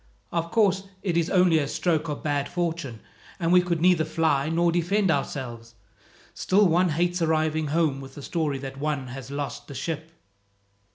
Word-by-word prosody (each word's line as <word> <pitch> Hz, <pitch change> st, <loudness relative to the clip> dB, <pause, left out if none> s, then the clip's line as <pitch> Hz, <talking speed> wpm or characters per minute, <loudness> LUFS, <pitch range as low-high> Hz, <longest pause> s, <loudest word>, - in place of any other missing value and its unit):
"Of 170 Hz, -1 st, -1 dB
course, 195 Hz, -3 st, +2 dB, 0.2 s
it 180 Hz, -4 st, -1 dB
is 170 Hz, -1 st, +1 dB
only 180 Hz, -4 st, +4 dB
a 145 Hz, -, -1 dB
stroke 160 Hz, +1 st, 0 dB
of 145 Hz, -, -5 dB
bad 145 Hz, -2 st, -1 dB
fortune, 165 Hz, -9 st, -3 dB, 0.4 s
and 170 Hz, 0 st, +1 dB
we 180 Hz, -, +7 dB
could 175 Hz, -2 st, -1 dB
neither 175 Hz, -2 st, +4 dB
fly 155 Hz, -2 st, +1 dB
nor 170 Hz, +1 st, +2 dB
defend 180 Hz, +3 st, +1 dB
ourselves. 120 Hz, -5 st, -4 dB, 0.6 s
Still 200 Hz, +2 st, +3 dB
one 175 Hz, +2 st, +3 dB
hates 175 Hz, +3 st, 0 dB
arriving 155 Hz, -1 st, +1 dB
home 150 Hz, -3 st, +1 dB
with 135 Hz, 0 st, -11 dB
the 145 Hz, -, -9 dB
story 155 Hz, -4 st, -1 dB
that 135 Hz, 0 st, -7 dB
one 145 Hz, -3 st, -2 dB
has 130 Hz, +1 st, -8 dB
lost 140 Hz, 0 st, -5 dB
the 140 Hz, -, -9 dB
ship." 160 Hz, +4 st, -4 dB
160 Hz, 175 wpm, -25 LUFS, 140-175 Hz, 0.6 s, we